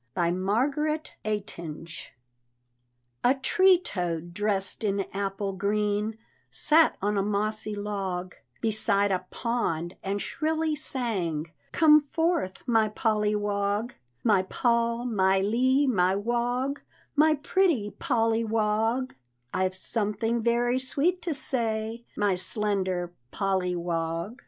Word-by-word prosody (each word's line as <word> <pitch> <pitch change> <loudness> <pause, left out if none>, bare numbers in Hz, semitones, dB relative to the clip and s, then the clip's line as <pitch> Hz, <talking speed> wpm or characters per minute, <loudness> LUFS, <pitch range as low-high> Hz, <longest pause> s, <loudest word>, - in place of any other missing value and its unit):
BY 170 -1 +2
MARGARET 275 - 0
EYTINGE. 170 -6 -5 1.1
A 255 +2 +5
tree 375 +7 +4
toad 175 - -4
dressed 200 0 -1
in 200 -1 +1
apple 195 0 -2
green 210 +2 0 0.3
Sat 315 +1 +3
on 205 0 +1
a - - +3
mossy 210 +1 -1
log 195 -3 -3 0.3
Beside 205 -2 +2
a 185 -1 -1
pond, 175 -8 -2
and 195 +1 -2
shrilly 315 +5 -1
sang, 180 - -2 0.2
"Come 300 -2 +5
forth, 325 - 0
my 225 -3 +3
Polly 210 -1 +1
Wog 205 +2 -1 0.3
My 210 -5 +4
Pol, 235 +3 0
my 190 -5 +2
Ly, 255 +8 +2
my 185 -6 +3
Wog, 245 +6 -1 0.3
My 310 +1 +5
pretty 290 - +1
Polly 230 -5 +1
Wog, 225 +3 0 0.4
I've 185 0 0
something 225 +3 -1
very 240 +2 +2
sweet 305 +8 0
to 335 -4 -2
say, 230 -3 -2
My 205 -2 +2
slender 185 -2 -1 0.2
Polly 190 -1 0
Wog! 170 +5 -3
210 Hz, 115 wpm, -27 LUFS, 195-245 Hz, 1.1 s, A